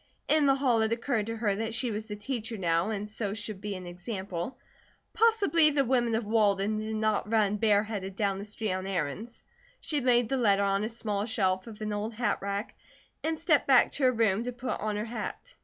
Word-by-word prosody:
In 305 Hz, -2 st, +4 dB
the 270 Hz, -, +5 dB
hall 255 Hz, -5 st, +2 dB
it 220 Hz, 0 st, +1 dB
occurred 230 Hz, -2 st, -1 dB
to 230 Hz, 0 st, -3 dB
her 215 Hz, -3 st, +1 dB
that 225 Hz, +2 st, -3 dB
she 240 Hz, 0 st, -1 dB
was 215 Hz, +1 st, -4 dB
the 210 Hz, -, -5 dB
"Teacher" 225 Hz, +1 st, -4 dB
now, 170 Hz, +1 st, +1 dB
and 210 Hz, -1 st, -3 dB
so 210 Hz, -1 st, -3 dB
should 210 Hz, -2 st, -5 dB
be 205 Hz, -1 st, -4 dB
an 185 Hz, -1 st, -7 dB
example. 185 Hz, +4 st, -5 dB, 0.6 s
Possibly 415 Hz, -8 st, +4 dB
the 285 Hz, -2 st, +1 dB
women 240 Hz, -2 st, +2 dB
of 225 Hz, 0 st, -1 dB
Walden 210 Hz, -1 st, +2 dB
did 220 Hz, 0 st, -3 dB
not 215 Hz, -1 st, 0 dB
run 210 Hz, -2 st, +2 dB
bareheaded 205 Hz, -2 st, +1 dB
down 195 Hz, -1 st, 0 dB
the 200 Hz, -, -6 dB
street 210 Hz, -1 st, -3 dB
on 185 Hz, +1 st, -3 dB
errands. 190 Hz, +6 st, -4 dB, 0.4 s
She 300 Hz, -3 st, -1 dB
laid 245 Hz, -2 st, +3 dB
the 270 Hz, -, 0 dB
letter 200 Hz, -5 st, +3 dB
on 200 Hz, +1 st, +1 dB
a 215 Hz, -, -1 dB
small 215 Hz, -2 st, -2 dB
shelf 190 Hz, -3 st, 0 dB
of 220 Hz, -2 st, -10 dB
an 215 Hz, -1 st, -2 dB
old 215 Hz, +2 st, -3 dB
hatrack, 205 Hz, -2 st, -2 dB, 0.5 s
and 320 Hz, 0 st, 0 dB
stepped 320 Hz, -2 st, +2 dB
back 260 Hz, -3 st, +6 dB
to 285 Hz, -, -3 dB
her 255 Hz, -, +6 dB
room 225 Hz, -3 st, +2 dB
to 250 Hz, -, -2 dB
put 245 Hz, +1 st, -4 dB
on 210 Hz, 0 st, -2 dB
her 210 Hz, +1 st, -2 dB
hat. 235 Hz, -, -6 dB
215 Hz, 215 wpm, -29 LUFS, 200-240 Hz, 0.6 s, back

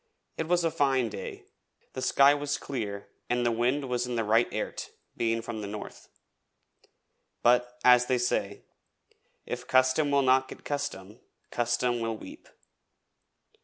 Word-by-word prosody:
It 160 Hz, -, -3 dB
was 175 Hz, 0 st, +2 dB
a 165 Hz, -, +1 dB
fine 135 Hz, -6 st, +1 dB
day, 105 Hz, -, -7 dB, 0.5 s
the 130 Hz, -, -5 dB
sky 140 Hz, +2 st, +5 dB
was 145 Hz, 0 st, -2 dB
clear 105 Hz, -7 st, -5 dB, 0.2 s
and 120 Hz, 0 st, +1 dB
the 120 Hz, -, +3 dB
wind 125 Hz, +5 st, 0 dB
was 125 Hz, -1 st, -1 dB
in 125 Hz, -, -3 dB
the 115 Hz, -, 0 dB
right 110 Hz, +3 st, +3 dB
airt, -, -, -4 dB, 0.3 s
being 115 Hz, 0 st, 0 dB
from 115 Hz, -2 st, -5 dB
the 100 Hz, -, -5 dB
north. 105 Hz, +1 st, -8 dB, 1.3 s
But, 125 Hz, 0 st, +3 dB
as 125 Hz, 0 st, +6 dB
they 130 Hz, -, +2 dB
say, 105 Hz, -5 st, -1 dB, 0.8 s
'If -, -, -5 dB
custom 130 Hz, +3 st, +3 dB
will 140 Hz, -1 st, +3 dB
not 130 Hz, 0 st, +4 dB
get -, -, -12 dB
custom, 120 Hz, -8 st, -4 dB, 0.3 s
custom 120 Hz, 0 st, 0 dB
will 115 Hz, -1 st, -2 dB
weep.' -, -, -12 dB
125 Hz, 150 wpm, -28 LUFS, 115-135 Hz, 1.3 s, as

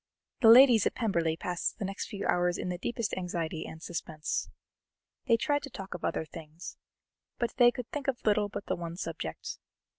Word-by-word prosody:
The 230 Hz, -, +6 dB
ladies 235 Hz, -2 st, +8 dB
at -, -, -3 dB
Pemberley 170 Hz, -8 st, 0 dB
passed 175 Hz, 0 st, -2 dB
the 200 Hz, -, -3 dB
next 195 Hz, +1 st, -4 dB
few 200 Hz, -2 st, -5 dB
hours 175 Hz, 0 st, +2 dB
in -, -, -3 dB
the 180 Hz, -1 st, -3 dB
deepest 235 Hz, +2 st, -2 dB
anxiety 170 Hz, -3 st, -3 dB
and 160 Hz, +1 st, -10 dB
suspense. 160 Hz, -2 st, -3 dB, 0.8 s
They 230 Hz, -2 st, +5 dB
tried 290 Hz, +4 st, +1 dB
to 280 Hz, -, -7 dB
talk 195 Hz, -5 st, -7 dB
of 180 Hz, -, -8 dB
other -, -, -1 dB
things, 160 Hz, +1 st, -9 dB, 0.6 s
but 235 Hz, -, -1 dB
they 245 Hz, -1 st, +8 dB
could 240 Hz, -1 st, -5 dB
think 290 Hz, -2 st, -4 dB
of 265 Hz, -2 st, -2 dB
little 210 Hz, -1 st, +3 dB
but 200 Hz, -, -6 dB
the -, -, -1 dB
one 170 Hz, 0 st, -6 dB
subject. -, -, -5 dB
195 Hz, 190 wpm, -30 LUFS, 170-235 Hz, 0.8 s, ladies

